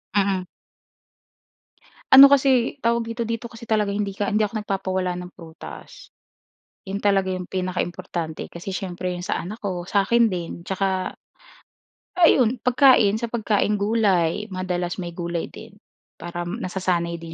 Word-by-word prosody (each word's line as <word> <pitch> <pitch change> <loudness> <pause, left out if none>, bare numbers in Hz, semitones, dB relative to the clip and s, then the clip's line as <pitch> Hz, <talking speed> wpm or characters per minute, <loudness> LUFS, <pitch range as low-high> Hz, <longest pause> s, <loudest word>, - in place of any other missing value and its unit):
Mm. 195 -2 +1 1.7
Ano 270 +1 +12
kasi, 265 -3 +3
tawag 230 0 +1
dito, 230 +1 -3
dito 230 +1 -4
kasi 230 0 -13
talaga 215 -2 +1
hindi 205 -1 -1
ka 200 +1 -3
hindi 210 +2 +2
ako 215 +1 -2
nagpapawala 190 -3 -2
ng 180 0 -7
prutas. 165 -3 -12 0.8
'Yon 195 +1 -4
talaga 195 -2 +2
'yong 180 -1 -6
pinaka-importante 175 -3 -3
kasi 170 +3 -8
siyempre 185 -1 -4
'yong 180 0 -5
sa - - -1
anak 205 +6 -7
ko, 185 -5 -4
sa 195 +2 +1
'kin 235 +1 +4
din 170 -2 -5
tsaka, 190 0 -1 1.1
ayun 255 -7 +4
pagkain, 250 -5 +5
sa 235 - -2
pagkaing 210 -3 0
gulay, 205 -3 +1
madalas 180 -1 -3
may 175 - -5
gulay 170 -1 -4
din - - -12 0.5
para, 175 0 -5
nasasanay 180 -3 -2
din 165 0 -9
195 Hz, 140 wpm, -23 LUFS, 180-225 Hz, 1.7 s, Ano